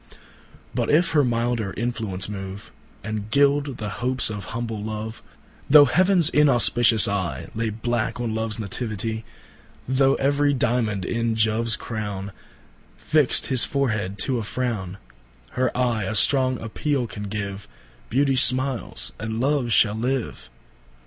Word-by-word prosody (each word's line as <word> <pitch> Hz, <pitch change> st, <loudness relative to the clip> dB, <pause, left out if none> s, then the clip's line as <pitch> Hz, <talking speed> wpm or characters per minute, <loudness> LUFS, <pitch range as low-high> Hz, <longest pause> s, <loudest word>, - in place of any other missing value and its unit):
But -, -, -1 dB
if 170 Hz, +3 st, +3 dB
her 150 Hz, -2 st, +3 dB
milder 115 Hz, -4 st, -1 dB
influence 110 Hz, -5 st, -2 dB
move, 100 Hz, -1 st, -7 dB, 0.3 s
And 110 Hz, 0 st, -5 dB
gild 140 Hz, 0 st, +2 dB
the 105 Hz, -2 st, -4 dB
hopes 125 Hz, -2 st, 0 dB
of 105 Hz, -1 st, -6 dB
humble 115 Hz, -3 st, -5 dB
Love:(Though 110 Hz, +6 st, +1 dB
heavens 180 Hz, +3 st, +4 dB
inauspicious 120 Hz, -5 st, +5 dB
eyeLay 100 Hz, +3 st, -3 dB
blacke 120 Hz, -1 st, -1 dB
on 120 Hz, -2 st, -2 dB
Loves 110 Hz, 0 st, -1 dB
Nativitie; 110 Hz, +1 st, -4 dB, 0.6 s
Though 135 Hz, +1 st, +3 dB
every 145 Hz, +1 st, +1 dB
Diamond 115 Hz, -6 st, 0 dB
in 115 Hz, +1 st, -1 dB
Joves 110 Hz, +1 st, +1 dB
crowneFixt 110 Hz, +7 st, -3 dB
his 130 Hz, -3 st, +4 dB
forehead 110 Hz, -8 st, -1 dB
to 130 Hz, -3 st, -1 dB
a -, -, -4 dB
frowne,)Her 90 Hz, -, -5 dB
Eye 120 Hz, -5 st, 0 dB
a 110 Hz, -, -3 dB
strong 130 Hz, +3 st, +3 dB
appeale 130 Hz, +4 st, -2 dB
can 105 Hz, -2 st, -7 dB
give, 100 Hz, -1 st, -5 dB, 0.4 s
Beauty 135 Hz, +2 st, +2 dB
smiles 130 Hz, -, +1 dB
and 110 Hz, 0 st, -4 dB
Love 135 Hz, -2 st, 0 dB
shall 105 Hz, -2 st, +4 dB
live. 120 Hz, -, -3 dB
115 Hz, 120 wpm, -23 LUFS, 105-130 Hz, 0.6 s, inauspicious